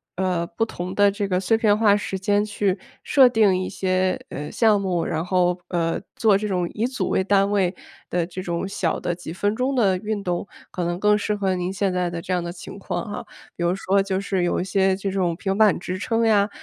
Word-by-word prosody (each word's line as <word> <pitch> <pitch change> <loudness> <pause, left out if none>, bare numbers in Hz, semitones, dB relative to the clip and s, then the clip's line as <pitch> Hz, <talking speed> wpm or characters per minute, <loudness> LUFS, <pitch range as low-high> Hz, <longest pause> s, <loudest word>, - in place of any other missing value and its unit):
呃， 180 -2 -1
不 195 +7 -1
同 185 -3 -6
的 205 0 +5
这 200 0 -2
个 180 -1 +1
碎 195 +4 +2
片 210 -2 +3
化 210 -2 +5
时 205 -2 -3
间 205 +2 +1
去 205 -2 -1 0.2
设 265 -3 +6
定 215 -5 +3
一 185 - -3
些， 185 0 0
呃， 150 +2 -6
项 215 -3 +3
目， 180 -3 -1
然 160 +1 -2
后， 180 0 +1
呃， 165 -2 -1
做 215 -3 +4
这 210 +1 -3
种 180 -3 0
以 225 +3 0
组 255 - -3
为 - - +1
单 200 +1 +2
位 190 -3 +2 0.4
的 175 -1 0
这 185 +2 -7
种 170 0 -3
小 185 -4 -1
的 175 - -2
几 175 -2 -8
分 205 +4 -1
钟 255 +3 0
的 200 -7 +3
运 210 +2 -3
动， 180 +2 -2 0.2
可 180 - -3
能 175 +1 -2
更 210 +1 +4
适 210 0 -1
合 195 -2 0
您 180 0 -2
现 195 -1 -1
在 180 -1 0
的， 175 -1 -5
这 185 - -3
样 180 -1 0
的 170 - -4
情 175 +2 -10
况 - - -3
啊。 210 - -6 0.3
比 175 - -4
如 175 +1 +2
说 195 0 +1
就 190 -1 -1
是 195 -2 -1
有 175 - 0
一 - - -1
些 190 0 +2
这 195 0 -3
种 185 -3 0
平 195 +1 -2
板 215 -3 +5
支 180 +1 -4
撑 225 +3 0
呀， 210 -2 +3
190 Hz, 255 characters per minute, -23 LUFS, 180-205 Hz, 0.4 s, 设